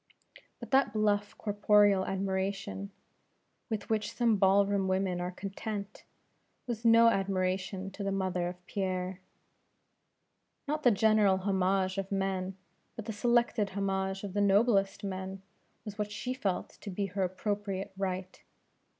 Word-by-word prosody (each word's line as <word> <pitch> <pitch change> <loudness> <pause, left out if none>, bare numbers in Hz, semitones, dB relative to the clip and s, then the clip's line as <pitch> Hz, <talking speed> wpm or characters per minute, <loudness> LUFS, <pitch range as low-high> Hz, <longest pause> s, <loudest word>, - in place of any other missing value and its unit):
But - - -9
that 265 -5 +4
bluff 205 -1 +1
corporeal 205 -2 +3
admiration, 195 +1 -2 0.8
with 215 -3 -3
which 215 -1 0
some 235 -3 +3
ball 195 +1 +5
room 200 -1 0
women 185 -1 0
are 180 - -2
content, 200 +2 -6 0.6
was 235 -3 -4
no 230 0 +7
admiration 190 -1 -1
to 200 +1 -6
the 195 - -1
mother 185 -2 -1
of 180 0 -8
Pierre. 185 -2 -2 1.5
Not 305 +1 -1
the 250 - +6
general 215 -2 +4
homage 190 0 +1
of 195 0 -5
men, 190 -1 -1 0.4
but 225 - -7
the 220 - -4
selected 235 -1 +2
homage 195 0 -1
of 200 -2 -5
the 205 - +1
noblest 200 -1 +3
men, 190 0 -5 0.4
was 210 0 -8
what 210 0 -2
she 250 +4 -3
felt 200 -8 -2
to - - -6
be 200 +1 -2
her 195 +1 -3
appropriate 195 +1 -2
right. 185 -1 -4
195 Hz, 140 wpm, -31 LUFS, 190-210 Hz, 1.5 s, no